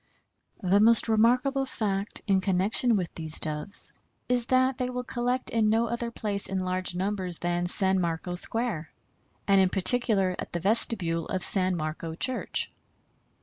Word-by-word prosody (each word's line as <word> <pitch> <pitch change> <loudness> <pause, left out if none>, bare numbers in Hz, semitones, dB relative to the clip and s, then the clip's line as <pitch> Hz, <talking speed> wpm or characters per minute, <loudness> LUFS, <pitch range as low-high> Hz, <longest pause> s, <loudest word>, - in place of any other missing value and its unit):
The 190 +2 +3
most 230 +2 +6
remarkable 250 +5 +2
fact 200 -4 -4
in 195 -3 +2
connection 200 +5 +1
with 180 -4 -3
these 160 -1 -2
Doves 155 +5 +4 0.3
is 245 -1 0
that 260 0 +2
they 250 -2 -2
will 250 0 -4
collect 245 +1 -3
in 220 -2 +1
no 225 +2 +2
other 235 +1 -4
place 205 -3 -2
in 190 -1 -3
large 185 -1 -3
numbers 185 -2 -3
than 175 0 -2
San 190 +1 +3
Marco 170 +1 -3
Square, 180 -4 0 0.6
and 195 -1 +5
in 190 - +3
particular 195 -2 +1
at - - -7
the 175 - -2
vestibule 185 -4 -1
of 185 -1 -2
San 185 -2 +1
Marco 160 0 -5
Church. 255 +8 -1
195 Hz, 155 wpm, -26 LUFS, 180-235 Hz, 0.6 s, most